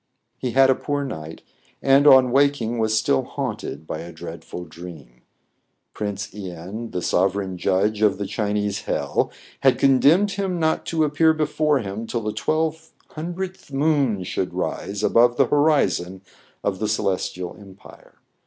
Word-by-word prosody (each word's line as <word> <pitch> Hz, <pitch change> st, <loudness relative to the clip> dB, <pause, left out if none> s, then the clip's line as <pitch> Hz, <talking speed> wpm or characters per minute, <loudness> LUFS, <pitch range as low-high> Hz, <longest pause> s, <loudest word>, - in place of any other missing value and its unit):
He 125 Hz, -2 st, -3 dB
had 135 Hz, 0 st, +6 dB
a -, -, +5 dB
poor 145 Hz, +2 st, -2 dB
night, 80 Hz, -, -7 dB, 0.4 s
and, 135 Hz, +2 st, +4 dB
on 130 Hz, -3 st, +7 dB
waking, 135 Hz, -4 st, +2 dB
was 110 Hz, 0 st, +1 dB
still 70 Hz, -11 st, +2 dB
haunted 75 Hz, -, -5 dB
by 80 Hz, -, -5 dB
a 85 Hz, -, -8 dB
dreadful 85 Hz, +2 st, -8 dB
dream. 80 Hz, -8 st, -12 dB, 0.7 s
Prince 105 Hz, 0 st, -4 dB
len, 95 Hz, +3 st, -7 dB
the 90 Hz, -, -4 dB
sov 95 Hz, +1 st, +2 dB
ereign 95 Hz, -2 st, -3 dB
judge 105 Hz, +4 st, 0 dB
of 105 Hz, -3 st, +3 dB
the 100 Hz, -, -3 dB
Chinese 105 Hz, 0 st, -2 dB
hell, -, -, -1 dB, 0.3 s
had -, -, +4 dB
condemned 145 Hz, +9 st, +4 dB
him 190 Hz, -3 st, -2 dB
not 160 Hz, -1 st, 0 dB
to 160 Hz, -2 st, +1 dB
appear 160 Hz, +2 st, +3 dB
before 155 Hz, -1 st, +1 dB
him 105 Hz, +2 st, -5 dB
till 120 Hz, -, -2 dB
the 105 Hz, -1 st, -3 dB
twelve 160 Hz, 0 st, -1 dB, 0.2 s
hun 165 Hz, +3 st, -5 dB
dredth 190 Hz, -3 st, -6 dB
moon 135 Hz, -8 st, +1 dB
should -, -, -3 dB
rise 100 Hz, +1 st, -3 dB
above 120 Hz, +2 st, +4 dB
the -, -, +5 dB
horizon 140 Hz, -, +1 dB, 0.4 s
of 95 Hz, -2 st, -1 dB
the 110 Hz, -, -1 dB
Celestial 95 Hz, -4 st, -2 dB
empire. 100 Hz, -1 st, -16 dB
110 Hz, 155 wpm, -23 LUFS, 95-145 Hz, 0.7 s, on